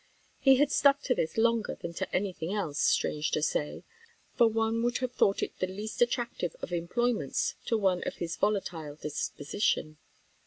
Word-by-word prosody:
He 270 -1 +6
had 290 +2 +3
stuck 280 0 +4
to 250 - +2
this 160 -6 -2
longer 230 -1 +2
than 170 - -6
to - - -4
any 190 0 0
thing 165 +1 -5
else, 160 -8 -2
strange 150 0 +2
to 155 - 0
say; 150 -1 -1 0.5
for 235 - +5
one 225 +1 0
would 240 0 +1
have 255 -2 -2
thought 200 -5 +2
it - - -3
the 185 - 0
least 210 +5 -6
attractive 240 -8 0
of - - -6
employments 205 - 0
to 230 - +2
one 190 -4 +2
of - - -3
his 170 -1 -4
volatile 175 -8 -1
disposition. 155 +1 -2
205 Hz, 180 wpm, -29 LUFS, 165-235 Hz, 0.5 s, He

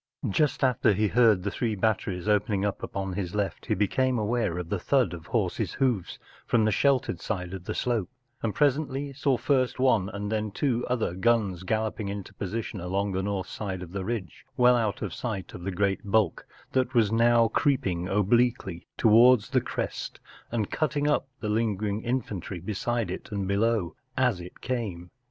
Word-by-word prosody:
Just 145 +9 +1
after 125 -4 +3
he 105 +2 +1
heard 110 -6 +4
the 100 - -1
three 110 0 -1
batteries 100 -2 -1
opening 105 -1 +2
up 100 - -2
upon 95 -1 -4
his 90 0 -3
left 100 -2 -2
he - - +1
became 125 +6 +1
aware 110 -5 0
of 90 -2 -4
the 100 - -1
thud 125 - +2
of 85 -2 -9
horses’ - - -1
hoofs 120 -9 0 0.3
from 115 -3 +3
the 110 - +3
sheltered 130 - +1
side 90 -2 -3
of 95 -2 -7
the - - -3
slope, 115 -6 0 0.3
and 110 -3 -2
presently 145 -1 +1
saw 135 -1 +1
first 130 +1 +1
one 115 -7 +3
and 105 -1 -4
then 110 -1 -1
two 120 +3 0
other 120 -8 0
guns 100 -2 +1
galloping 110 +1 -2
into 100 -1 -6
posi¬ 110 +4 -3
tion 100 - -7
along 100 +3 -1
the 95 0 -1
north 100 -1 -2
side 95 -4 -5
of 85 - -10
the 95 0 -3
ridge, 100 -6 -4
well 125 0 +6
out 110 -4 -1
of 95 -5 -4
sight 110 -7 -4
of - - -8
the 95 +2 -3
great 95 +1 +1
bulk 105 -3 +1 0.2
that 130 -1 0
was 110 -3 +4
now 115 0 +4
creeping 95 - +1
obliquely 105 -3 +1
towards 115 0 +6
the - - +3
crest - - -4 0.3
and 110 -3 -1
cutting 150 -1 0
up 150 -2 +1
the 110 - -2
lingering 105 -1 0
infantry 105 -7 -3
beside 105 +2 -2
it 95 - -7
and 100 -2 -2
below, 100 -2 +1 0.2
as 125 -8 +2
it 90 - -11
came. 100 -9 -3
105 Hz, 185 wpm, -27 LUFS, 95-120 Hz, 0.3 s, well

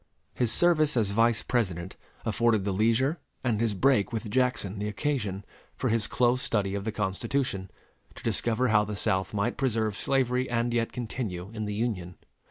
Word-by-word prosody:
His 120 -3 +1
service 155 -5 +3
as 105 -4 +2
Vice 115 +2 +3
President 95 -7 -1 0.3
afforded 110 -1 +2
the 100 - 0
leisure 115 - +2 0.2
and 115 -4 0
his 115 -3 +1
break 125 -1 +3
with 110 -2 -4
Jackson 125 -6 0
the 105 - -2
occasion, 105 -4 -2 0.3
for - - -1
his 110 -1 +3
close 125 +1 +2
study 100 -3 0
of 100 0 -3
the 110 - -1
Constitution, 105 0 -2 0.5
to - - -12
discover 120 +2 +1
how 105 -1 +4
the 105 0 -4
South 95 -1 +1
might 105 +3 -1
preserve 110 -6 0
slavery 130 +1 0
and 120 0 0
yet 115 -1 0
continue 110 -6 -4
in 110 -1 -3
the 105 0 -3
Union. 100 -6 -2
110 Hz, 175 wpm, -28 LUFS, 100-125 Hz, 0.5 s, how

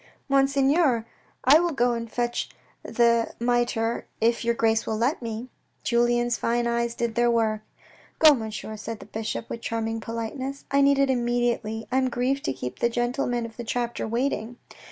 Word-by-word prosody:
" - - -41
Monseigneur, 275 -2 +3 0.4
I 285 +5 +7
will 345 -1 0
go 245 -2 +2
and 230 -1 -5
fetch 240 -1 -1 0.3
the 235 -1 +2
mitre 240 -1 0
if 230 +1 +2
your 235 0 +1
grace 225 -1 +1
will 220 - -1
let 250 +7 0
me." 230 +1 -5 0.3
Julien's 240 0 +2
fine 240 +1 0
eyes 235 0 0
did 235 -1 -1
their 240 +1 +2
work. 220 -2 +1 0.3
" - - -28
Go, 310 -2 +8
Monsieur," 220 -3 -5
answered 215 +1 -6
the - - -11
bishop, 220 +1 -4
with 230 - -6
charming 225 -1 -2
polite 230 +3 -5
ness. 275 +2 -5
" - - -41
I 280 0 +4
need 280 0 +5
it 275 -1 +3
immediately. 240 -3 0
I 260 - +3
am 260 -1 +1
grieved 255 +3 -1
to - - +1
keep 125 -1 -6
the 235 - +2
gentlemen 240 0 -1
of 225 -1 -10
the 240 - -5
chapter 240 0 -2
waiting." 235 -1 -2
235 Hz, 190 wpm, -25 LUFS, 230-250 Hz, 0.4 s, Go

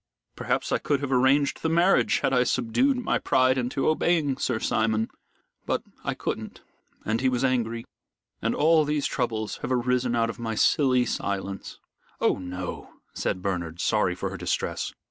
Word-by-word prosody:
Perhaps - - -1
I - - +2
could 145 -2 0
have 140 -1 -3
arranged 135 +2 +3
the 160 - 0
marriage 170 +4 +3
had 135 - +1
I 125 -1 +4
subdued 125 - +1
my 250 - 0
pride 130 0 +3
into 130 +1 -1
obeying 155 -3 +2
Sir 125 -4 0
Simon. 110 0 0 0.6
But - - 0 0.2
I - - -2
couldn't, - - -5 0.4
and 110 +2 0
he 130 - +3
was 125 0 -1
angry, 115 -3 0 0.6
and - - 0
all 160 +1 +4
these 150 -1 -1
troubles 110 -4 -2
have - - -5
arisen 125 -1 +1
out 115 -1 +1
of 120 - -15
my 115 -1 -3
silly 125 0 +3
silence." 100 -2 -4 0.4
"Oh, - - +2
no," 90 0 -6 0.2
said 90 - -2
Bernard, 85 -4 -3
sorry 90 -3 +1
for 95 +1 -4
her 95 - -6
distress. 90 0 -2
125 Hz, 165 wpm, -26 LUFS, 110-140 Hz, 0.6 s, I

